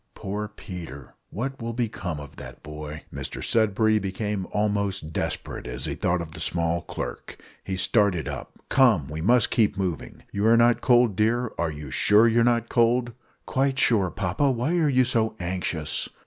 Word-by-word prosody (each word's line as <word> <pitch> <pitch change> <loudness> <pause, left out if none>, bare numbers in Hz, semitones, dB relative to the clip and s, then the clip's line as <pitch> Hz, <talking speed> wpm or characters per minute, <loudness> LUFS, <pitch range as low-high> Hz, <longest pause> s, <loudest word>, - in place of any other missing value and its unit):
Poor 105 +1 -4
Peter! 90 - -9 0.2
what 135 +5 -4
will 115 0 -3
become 100 -9 -3
of 70 -2 -11
that - - -10
boy?" 75 0 -8
Mr - - -5
Sudberry 110 0 +2
became 100 0 -3
almost, 100 -5 -1
desperate - - -3
as 60 0 -2
he - - -2
thought 90 0 0
of 80 -2 -7
the - - -9
small 85 0 0
clerk. - - -7 0.3
He 95 -1 -4
started 95 -3 +2
up. - - -7
"Come, 110 - +3
we 80 +1 -5
must 120 +6 +3
keep 105 -3 +2
moving. 90 -5 -4
You 100 +2 0
are 115 +1 +6
not 120 0 +4
cold, 120 -4 +4
dear? 115 +3 +1
are 85 -1 +1
you 75 -3 -8
sure 105 - +5
you 115 +1 +3
are - - +4
not 115 -1 +2
cold?" 120 +1 +2 0.3
"Quite 135 0 0
sure, 105 -8 +3
papa; 90 - 0
why 130 +7 0
are 155 -3 +3
you 130 -2 +4
so 115 -3 0
anxious?" 85 -3 -2
105 Hz, 175 wpm, -25 LUFS, 85-115 Hz, 0.3 s, are